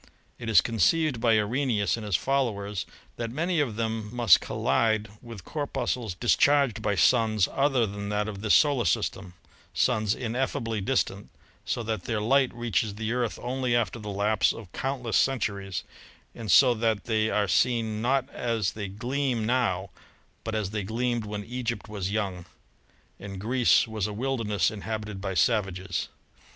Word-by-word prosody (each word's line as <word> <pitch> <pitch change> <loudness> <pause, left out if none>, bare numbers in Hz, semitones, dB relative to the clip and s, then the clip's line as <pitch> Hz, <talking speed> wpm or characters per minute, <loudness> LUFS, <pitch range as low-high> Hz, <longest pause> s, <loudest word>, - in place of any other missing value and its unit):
It 115 - -5
is 110 - +7
conceived 130 +3 +1
by 115 -2 +4
Arrhenius 110 -1 +1
and 115 - -7
his 105 -3 0
followers 105 -6 -1 0.3
that 115 -1 -3
many 165 +7 -1
of 130 -8 0
them 110 -1 -2
must 120 -1 +5
col - - -5
lide 110 -2 +2
with 115 -7 -10
corpuscles 125 - -3
discharged 125 +1 +3
by 105 -1 0
suns 110 0 +3
other 135 -4 +2
than 100 0 -5
that 105 0 -1
of 100 -2 -6
this 110 -1 +4
solar 140 -6 +3
system 90 +1 -1 0.2
— - - -30
suns 110 -4 +1
ineffably 115 -2 -2
distant, 100 -3 -1 0.4
so 120 - -2
that 110 -4 -3
their 115 -2 -1
light 130 +4 +3
reaches 110 -4 -1
the 110 +2 -2
Earth 125 -2 -1
only 125 -1 0
after 120 0 0
the 105 -1 -7
lapse 100 +1 +2
of 105 -6 -11
countless 130 -4 -1
centuries, 100 -7 -1 0.5
and 115 -3 -7
so 125 +6 +7
that 110 -3 0
they 110 -1 +1
are 105 -2 +1
seen 110 +1 +1
not 130 +2 +1
as 115 -5 -1
they 105 -2 -5
gleam 120 +3 -2
now, 105 -6 0 0.5
but 110 -1 -3
as 105 -3 -2
they 105 -1 -2
gleamed 115 +3 -1
when 105 0 -5
Egypt 120 -1 -4
was 100 -3 -4
young 100 -4 -2 0.7
and 95 -1 -7
Greece 115 -1 +3
was 110 -2 -2
a 105 - -5
wilderness 115 -4 0
inhabited 105 -1 -5
by 95 -1 -3
savages. 95 0 0
110 Hz, 165 wpm, -27 LUFS, 105-125 Hz, 0.7 s, is